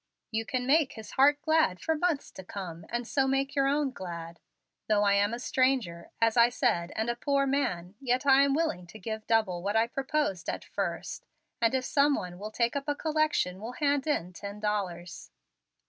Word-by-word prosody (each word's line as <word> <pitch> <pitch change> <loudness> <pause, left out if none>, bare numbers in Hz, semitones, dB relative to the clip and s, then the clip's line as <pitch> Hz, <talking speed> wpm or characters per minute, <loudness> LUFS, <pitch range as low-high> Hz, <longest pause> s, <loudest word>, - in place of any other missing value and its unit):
You 225 0 -2
can 250 -1 -1
make 290 +1 +3
his 220 -2 -10
heart 290 +2 +4
glad 315 - +2
for 320 - 0
months 315 -2 -1
to 190 - -10
come, 175 -3 -7
and 240 0 -3
so 270 0 +1
make 270 +1 0
your 275 -2 +2
own 285 0 +1
glad. 170 -5 -7 0.5
Though 210 -1 +4
I 200 -1 +4
am 200 +1 +3
a 235 - -3
stranger, 250 -10 0
as 225 -1 +3
I 235 0 +6
said, 220 -9 0
and 220 +1 -1
a 240 - 0
poor 275 +3 +1
man, 245 -11 -1
yet 255 0 0
I 270 0 +6
am 280 0 +3
willing 245 - -1
to 220 - -11
give 220 +2 -6
double 215 -6 +2
what 200 +3 -2
I 225 +1 +4
proposed 270 - -2
at - - -4
first, - - -4 0.3
and 230 +3 +3
if 255 -1 0
some 285 +1 +3
one 180 -5 -6
will 210 +2 -5
take 235 +3 0
up 280 +1 -3
a 290 - 0
collection 305 - 0
will 230 +3 -6
hand 285 +1 0
in 185 - -1
ten 200 +3 -7
dollars." 190 -5 -3
235 Hz, 205 wpm, -29 LUFS, 200-275 Hz, 0.5 s, I